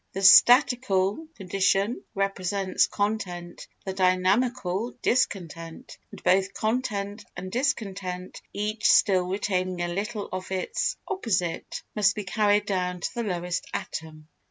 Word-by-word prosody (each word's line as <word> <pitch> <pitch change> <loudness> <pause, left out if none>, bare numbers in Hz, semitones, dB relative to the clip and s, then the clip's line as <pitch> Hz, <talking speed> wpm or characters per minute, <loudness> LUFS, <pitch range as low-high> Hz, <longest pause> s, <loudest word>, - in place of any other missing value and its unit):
The 195 - -4
statical 240 +2 +5
condition 195 +3 0
represents 195 -1 0
content, 190 -5 -3 0.2
the 190 - -3
dynamical, 190 +3 +1
discontent; 165 -8 -2
and - - -12
both 190 +2 +2
content 215 -3 -2
and 185 +1 -6
discontent, 195 -8 -3
each 210 +2 -3
still 185 -3 +4
retaining 185 -2 -1
a - - -1
little 210 +2 -3
of 185 0 -5
its 185 -1 -1
opposite, 235 - -2
must 205 -1 +3
be 210 - -4
carried 205 +2 +2
down 180 -2 -2
to - - -3
the 240 - -2
lowest 180 -4 -3
atom. 155 -1 -6
195 Hz, 120 wpm, -26 LUFS, 180-215 Hz, 0.2 s, statical